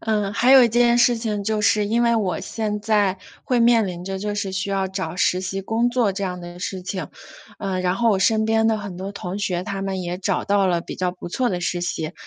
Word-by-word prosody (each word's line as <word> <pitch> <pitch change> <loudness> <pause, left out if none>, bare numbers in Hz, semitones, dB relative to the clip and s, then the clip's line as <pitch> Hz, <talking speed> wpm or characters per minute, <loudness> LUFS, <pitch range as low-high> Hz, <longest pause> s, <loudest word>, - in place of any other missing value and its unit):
嗯， 210 -2 -1
还 240 +5 +3
有 265 -2 +9
一 - - +3
件 240 +1 +3
事 240 0 +4
情 210 -3 -3
就 215 0 0
是， 210 0 +3
因 230 +3 +1
为 235 -1 +3
我 195 -5 -1
现 210 -2 -3
在 205 -3 +1 0.3
会 250 -2 +1
面 230 -2 +4
临 175 -2 -6
着 195 0 -4
就 205 +1 -3
是 200 -2 -2
需 190 +1 -2
要 195 -1 0
找 190 -1 -4
实 185 0 +2
习 195 +1 -3
工 225 +5 0
作 240 -4 +2
这 195 +1 -3
样 180 -1 -4
的 175 0 -9
事 185 +1 -4
情。 185 -4 -4 0.5
呃， 190 -2 -2
然 180 0 0
后 235 +3 +2
我 200 - +2
身 220 +2 +2
边 225 0 +2
的 220 -1 +2
很 200 -3 -7
多 195 +2 -6
同 190 -1 -5
学， 180 -3 -1
他 195 0 -4
们 195 -1 -3
也 175 0 -3
找 195 -1 -1
到 200 -1 +2
了 175 -2 +1
比 - - -8
较 180 -1 -1
不 180 -1 -9
错 250 +6 0
的 180 -2 -2
实 175 0 -2
习。 165 -2 -3
200 Hz, 275 characters per minute, -22 LUFS, 185-220 Hz, 0.5 s, 有